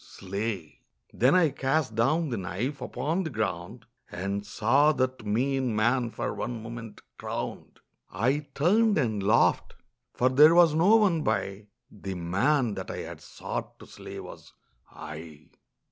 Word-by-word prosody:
Slay!' 100 -3 -5 0.3
Then 130 +8 +3
I 175 -4 +5
cast 135 -2 0
down 150 +9 +1
the 120 - -2
knife 105 +10 -4
upon 165 +5 -2
the 165 - -3
ground 110 - -4 0.2
And 100 +3 -3
saw 135 +9 +3
that 130 -4 -2
mean 130 +2 0
man 120 +3 +2
for - - -4
one 120 -2 -5
moment 115 -1 -8 0.2
crowned. - - -6 0.3
I 135 +9 0
turned 205 +7 +3
and 110 -8 0
laughed: 105 +4 +2 0.4
for 125 - +2
there 150 +5 +7
was 170 -3 +6
no 180 +8 +5
one 195 -8 +3
by 100 -7 -2 0.2
The 95 -2 -6
man 105 - +1
that 95 -2 -6
I - - -4
had - - -8
sought - - -6
to - - -13
slay - - -10
was - - -11 0.4
I. 75 -1 -10
120 Hz, 145 wpm, -27 LUFS, 100-150 Hz, 0.4 s, there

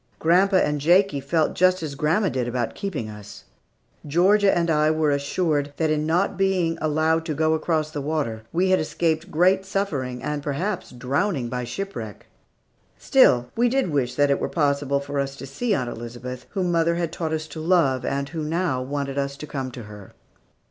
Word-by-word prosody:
Grandpa 185 +4 +3
and 150 -5 +2
Jakie 175 0 +4
felt 155 +3 +1
just 185 -1 +3
as 150 -3 -4
grandma 160 +8 +1
did 125 -2 -2
about 120 -1 -2
keeping 170 - -4
us. 105 -2 -10 0.6
Georgia 195 +6 +4
and 170 -1 +1
I 155 0 +3
were 155 -1 +2
assured 145 0 0
that 160 -1 +1
in 155 0 0
not 180 +4 +1
being 185 -4 +1
allowed 155 +1 +1
to 155 -3 -2
go 160 +2 +2
across 155 -1 0
the 145 - -4
water, 140 -7 -2
we 185 +3 +1
had 185 - +4
escaped 160 +2 -1
great 185 +3 +3
suffering, 145 -11 -3
and, 150 -1 -2
perhaps, 170 +8 -3
drowning 135 +2 -1
by 125 0 -3
shipwreck. 120 - -6 0.7
Still, 125 - +4
we 240 +1 +3
did 260 -8 0
wish 125 -4 0
that 145 0 +3
it 140 - +2
were - - -2
possible 140 -3 +1
for 140 0 -3
us 135 0 -2
to 140 - -8
see 205 - -1
Aunt 125 -6 -2
Elizabeth, 120 +2 -7
whom 180 -2 -1
mother 170 0 +2
had 170 -2 -2
taught 160 -2 -3
us 155 0 -2
to 160 - -8
love, 155 -6 +2
and 140 0 -2
who 160 +1 -4
now 160 -4 -1
wanted 140 +1 -3
us 140 0 -3
to 150 - -7
come 135 -3 -4
to 120 -1 -9
her. 105 -2 -12
155 Hz, 190 wpm, -24 LUFS, 135-175 Hz, 0.7 s, Jakie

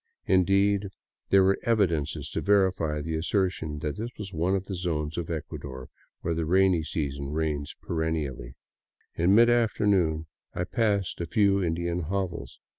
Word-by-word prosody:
Indeed 100 +2 +3 0.4
there 95 -1 +6
were 95 +1 +3
evidences 95 -11 0
to - - -2
verify 95 -6 +2
the 80 +2 -3
assertion 85 -2 -1
that 75 +3 -3
this 115 +3 -3
was 100 -2 -7
one 85 +4 +1
of 95 0 -2
the 100 - -5
zones 80 -4 -2
of 85 -2 -4
Ecuador 70 -5 -6 0.3
where 85 - -1
the 80 -1 -2
rainy 95 -1 +4
season 70 -3 -3
reigns 75 -1 -2
perennially. 80 -7 -3 0.6
In 90 +4 +3
midafternoon 105 -8 +3 0.3
I 85 - -1
passed 100 -2 0
a 85 - -3
few 100 +1 +3
Indian 85 +1 -1
hovels. 90 0 -4
85 Hz, 145 wpm, -27 LUFS, 80-100 Hz, 0.6 s, there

